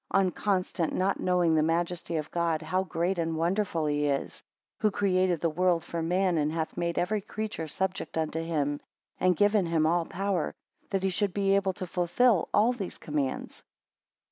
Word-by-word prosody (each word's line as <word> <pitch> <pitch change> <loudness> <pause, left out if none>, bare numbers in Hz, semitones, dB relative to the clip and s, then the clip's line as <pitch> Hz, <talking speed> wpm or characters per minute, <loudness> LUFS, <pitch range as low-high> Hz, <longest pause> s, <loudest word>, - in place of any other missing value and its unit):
19 195 -2 +4
Unconstant, 185 -4 0
not 190 +1 0
knowing 180 -2 +2
the 155 - +4
majesty 170 +1 -1
of 150 -1 -4
God 170 -2 0
how 185 +4 0
great 175 0 -1
and 165 -1 -1
wonderful 170 -1 0
he 145 0 +1
is; 140 -1 -2 0.4
who 215 - +3
created 185 -3 +1
the 165 - +2
world 175 0 +2
for 170 -1 -4
man, 180 +1 +1
and 150 0 +1
hath 160 0 -3
made 170 -1 -2
every 205 +4 0
creature 215 -5 -4
subject 190 +2 -3
unto 160 0 -1
him; 145 -3 -1 0.4
and 180 -2 +3
given 205 -3 +3
him 165 -2 +2
all 170 +1 +2
power, 195 -3 -1 0.3
that 195 -1 -1
he 190 - +2
should 200 0 -1
be 195 -1 +2
able 195 -1 +1
to 185 - -5
fulfil 180 +4 +2
all 220 +4 +4
these 200 -7 -6
commands. 145 -3 -3
175 Hz, 180 wpm, -28 LUFS, 160-195 Hz, 0.4 s, 19